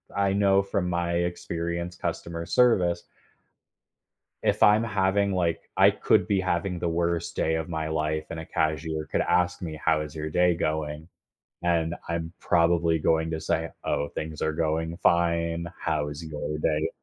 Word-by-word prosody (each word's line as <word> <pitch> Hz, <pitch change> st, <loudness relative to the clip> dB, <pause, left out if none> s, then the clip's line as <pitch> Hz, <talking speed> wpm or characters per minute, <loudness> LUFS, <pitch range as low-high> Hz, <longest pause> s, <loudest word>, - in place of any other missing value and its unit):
I 100 Hz, -1 st, +2 dB
know 100 Hz, -1 st, +4 dB
from 100 Hz, -2 st, -1 dB
my 85 Hz, 0 st, -1 dB
experience 85 Hz, 0 st, -2 dB
customer 85 Hz, -1 st, -4 dB
service. 90 Hz, -9 st, +3 dB, 1.4 s
If -, -, +1 dB
I'm 105 Hz, +2 st, +6 dB
having, 100 Hz, -1 st, +1 dB
like 85 Hz, -3 st, -1 dB
I -, -, +7 dB
could -, -, +2 dB
be 100 Hz, -, +2 dB
having 90 Hz, 0 st, -1 dB
the 85 Hz, -, -1 dB
worst 85 Hz, 0 st, -1 dB
day 80 Hz, -, +1 dB
of 80 Hz, 0 st, -3 dB
my 80 Hz, -2 st, -2 dB
life, 80 Hz, 0 st, -1 dB
and 80 Hz, -, -5 dB
a 80 Hz, -, -7 dB
cashier 80 Hz, 0 st, -1 dB
could -, -, +1 dB
ask 90 Hz, 0 st, +1 dB
me, 80 Hz, -3 st, -5 dB
"How 80 Hz, -2 st, +3 dB
is 75 Hz, 0 st, -7 dB
your 75 Hz, 0 st, -4 dB
day 90 Hz, +2 st, +3 dB
going?" 75 Hz, -1 st, -2 dB, 0.6 s
And 85 Hz, -1 st, +1 dB
I'm 85 Hz, 0 st, -2 dB
probably 85 Hz, -1 st, +2 dB
going 80 Hz, +1 st, +1 dB
to 80 Hz, -, -2 dB
say, 80 Hz, 0 st, -1 dB
"Oh, 75 Hz, -, 0 dB
things 80 Hz, -1 st, -6 dB
are 80 Hz, -, 0 dB
going 80 Hz, +1 st, -1 dB
fine. 85 Hz, -1 st, +1 dB
How 75 Hz, -2 st, -1 dB
is 75 Hz, +3 st, -7 dB
your 75 Hz, -1 st, -4 dB
day?" 75 Hz, 0 st, +1 dB
85 Hz, 165 wpm, -26 LUFS, 80-90 Hz, 1.4 s, I